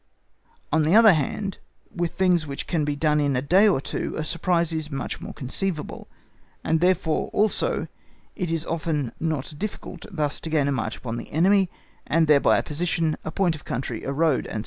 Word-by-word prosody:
On 155 - +4
the 155 +5 +3
other 220 -3 +8
hand, 200 +4 -2 0.4
with 175 -2 -1
things 180 -4 +2
which 140 -1 -5
can 165 -4 0
be 145 0 -1
done 150 0 +2
in 145 -2 +1
a 125 - +1
day 190 +8 +5
or 190 -10 +3
two, - - -4
a 155 - -1
surprise 170 +1 0
is 155 -1 -3
much 135 -3 -4
more - - -6
conceivable, 155 +5 -4 0.6
and, 160 0 +1
therefore, 180 -2 +1
also 215 0 +1 0.5
it 180 -5 -3
is 165 -1 -1
often 155 -6 -2
not 155 -3 -2
difficult 195 -3 -6
thus 150 -5 -1
to 160 - -6
gain 150 -3 +2
a - - +1
march 115 -4 -2
upon 115 -2 -5
the 120 - -8
enemy, 190 +4 +3 0.4
and 165 +1 +3
thereby 150 -2 +5
a - - 0
position, 160 0 -1
a - - -4
point 175 +1 +1
of 155 - -9
country, 120 -2 -4
a 135 - -2
road, 150 0 +1
&c. 110 - -3
160 Hz, 195 wpm, -24 LUFS, 145-180 Hz, 0.6 s, other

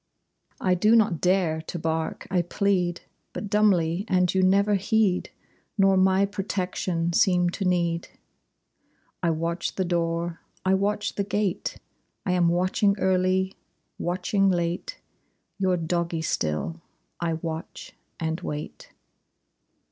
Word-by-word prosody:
I 185 - +2
do 210 +6 +4
not 210 -7 +3
dare 180 -4 +2
to 160 - -6
bark; 160 0 -2
I 180 -2 +3
plead 180 -1 0 0.3
But 205 - -5
dumbly, 185 -4 +3
and 180 -2 +2
you 190 - +2
never 200 +2 +4
heed; 200 -1 +1 0.5
Nor 195 -1 +5
my 190 +1 +4
protection 185 -3 -2
seem 180 -1 +3
to 195 - -3
need. 170 -2 0 1.1
I 175 - +2
watch 165 +2 -2
the 190 - 0
door, 170 -1 -1 0.3
I 190 - +3
watch 205 +2 0
the 200 - -1
gate; 205 -2 -2 0.5
I 185 - +1
am 180 -1 +3
watching 185 +3 +2
early, 190 0 +1 0.5
watching 185 +3 +1
late, 175 -1 -1 0.6
Your 185 -2 +2
doggie 170 -1 -1
still! 115 - -2 0.4
I 170 -1 0
watch 160 0 -6 0.3
and 160 +2 -2
wait. 150 - -6
180 Hz, 125 wpm, -26 LUFS, 170-195 Hz, 1.1 s, Nor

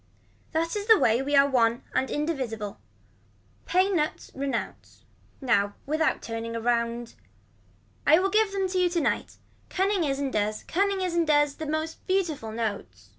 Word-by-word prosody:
That 330 +2 -1
is 410 0 -3
the 445 -1 +8
way 230 - +3
we 285 +2 0
are 280 0 +6
one 235 -3 +2
and 260 +1 0
indivisible. 255 -9 -3 0.9
Pay 370 +2 +3
nuts 325 -6 -2
renounce. 275 0 -5 0.4
Now 205 -6 +1
without 310 +2 0
turning 230 0 -5
around. 235 0 -1 0.9
I 310 +2 +7
will 385 +2 +1
give 430 0 +3
them 390 -1 0
to 370 0 0
you 360 -1 +3
tonight. 340 -3 -1 0.3
Cunning 385 -1 +1
is 275 -3 0
and 275 -2 -2
does 215 0 -1
cunning 395 +2 0
is 365 -2 -1
and 340 -2 +1
does 295 -1 +3
the 315 - -5
most 315 +1 -3
beautiful 335 - -1
notes. 200 - -5
290 Hz, 160 wpm, -26 LUFS, 235-355 Hz, 0.9 s, the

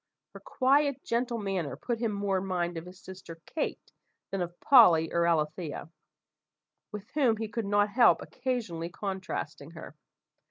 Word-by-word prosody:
Her - - -10
quiet, 275 +1 +1
gentle 235 0 -1
manner 195 -8 -3
put 240 -2 -3
him 230 -2 0
more 200 -2 0
in 195 - -6
mind 175 -2 -1
of 165 +1 -6
his 180 +1 -12
sister 185 -3 -10
Kate, 315 - -4 0.4
than 195 - -2
of 175 0 -5
Polly 175 - +6
or 170 0 +2
Alethea, 155 -1 -1 1.0
with 210 +2 -8
whom 255 -7 +2
he 220 0 -3
could 215 0 -4
not 205 +1 +2
help 240 +4 +5
occasionally 230 -11 -3
contrasting 185 -6 -5
her. 155 - -10
195 Hz, 155 wpm, -29 LUFS, 170-235 Hz, 1.0 s, Polly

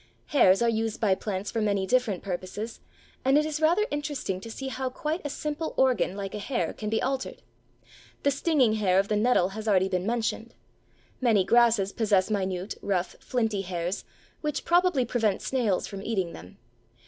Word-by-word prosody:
Hairs 235 -7 +5
are - - +3
used 225 -1 -1
by 205 -4 +3
plants 195 0 -3
for 225 - -1
many 200 -2 +1
different 235 -4 +1
purposes, 190 +4 -5 0.4
and 270 +2 +4
it 305 - +3
is 310 0 -3
rather 345 +7 +4
interesting 290 -10 -3
to 230 - -8
see 265 +4 -5
how 260 0 -3
quite 305 +6 -3
a 290 - -3
simple 300 +3 -4
organ 240 -8 +2
like 195 -1 -5
a 210 - -4
hair 200 -7 -2
can 210 - -5
be 220 - +1
altered. 265 - -3 0.8
The 280 - +3
stinging 275 -5 +2
hair 195 -4 +2
of 195 +1 +2
the 210 - +2
nettle 210 -4 +3
has 215 +2 -7
already 190 -2 +3
been 185 +1 -1
mentioned; 230 0 -2 0.7
many 225 -6 +4
grasses 230 -3 +3
possess 210 -3 +2
minute, 190 -1 -2
rough, 185 -3 -1
flinty 225 -5 -1
hairs, 180 0 -3 0.4
which 300 -1 -2
probably 350 -7 +3
prevent 220 -4 0
snails 235 -8 0
from 195 -2 -7
eating 195 -5 -2
them. 90 +3 -12
220 Hz, 180 wpm, -27 LUFS, 195-260 Hz, 0.8 s, Hairs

